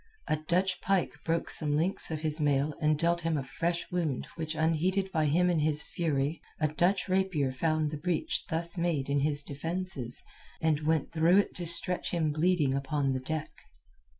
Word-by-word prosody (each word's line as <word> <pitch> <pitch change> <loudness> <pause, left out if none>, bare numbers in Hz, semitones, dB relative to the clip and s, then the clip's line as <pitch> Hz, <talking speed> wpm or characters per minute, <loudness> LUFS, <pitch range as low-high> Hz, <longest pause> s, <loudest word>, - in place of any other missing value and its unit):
A - - +2
Dutch 180 +4 0
pike 195 -2 +1
broke 165 0 -1
some 150 -2 +5
links 170 +6 -1
of 155 -1 -3
his 155 0 -1
mail 145 0 +1
and 155 -1 +3
dealt 170 +2 +1
him 165 -1 0
a 140 - -2
flesh 170 +5 -2
wound 165 -7 -1
which 160 -1 -4
went 160 +1 +2
unheeded 190 +4 0
by 160 -3 +1
him 175 +5 +3
in 175 -3 +2
his 150 0 +3
fury; 150 -2 -1 0.2
a 155 - +2
Dutch 175 +7 +1
rapier 185 -8 +1
found 155 +2 0
the 155 - -4
breach 170 +2 -1
thus 170 +2 +1
made 160 -6 0
in 140 - +2
his 145 0 +1
defences, 150 -4 -3 0.4
and 160 -2 +1
went 160 -3 +1
through 170 +3 +4
it 205 - +2
to 175 -1 -4
stretch 170 +2 0
him 160 -3 0
bleeding 155 -3 +2
upon 140 0 0
the 130 - -1
deck. 155 +4 -4
160 Hz, 190 wpm, -30 LUFS, 150-175 Hz, 0.4 s, some